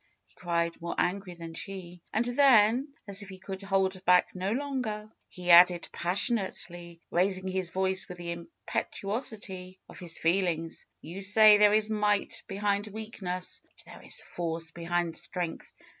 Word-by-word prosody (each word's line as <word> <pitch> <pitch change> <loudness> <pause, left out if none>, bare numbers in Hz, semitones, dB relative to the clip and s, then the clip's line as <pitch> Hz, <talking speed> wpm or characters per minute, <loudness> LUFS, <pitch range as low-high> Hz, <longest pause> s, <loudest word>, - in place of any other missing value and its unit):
he - - -30
cried 170 -1 -2
more 170 - -4
angry 180 0 -1
than 165 -1 -8
she. 180 -1 -7
And 225 +2 +1
then, 245 -1 +5 0.2
as 200 0 -1
if 200 - -9
he 190 - -9
could 190 +1 -7
hold 190 -1 0
hack 180 0 +5
no 185 +2 -2
longer, 240 -5 -3 0.2
he 180 -1 -1
added 175 0 +7
passionately, 175 -3 -1
raising 185 +1 +1
his 185 -2 -2
voice 190 +1 0
with 180 - -8
the 170 -1 -5
impetuosity 190 +2 -4
of - - -12
his 170 -2 -5
feelings. 165 -2 0 0.2
^^You 180 +5 -7
say 210 +1 +7
there 210 0 +7
is 215 0 +1
might 210 -1 +1
behind 200 +1 -1
weakness. 200 -4 -5
But - - -12
there - - -12
is - - -2
force 165 -1 -4
behind 170 0 -2
strength. 175 -2 -4
190 Hz, 155 wpm, -29 LUFS, 175-210 Hz, 0.2 s, added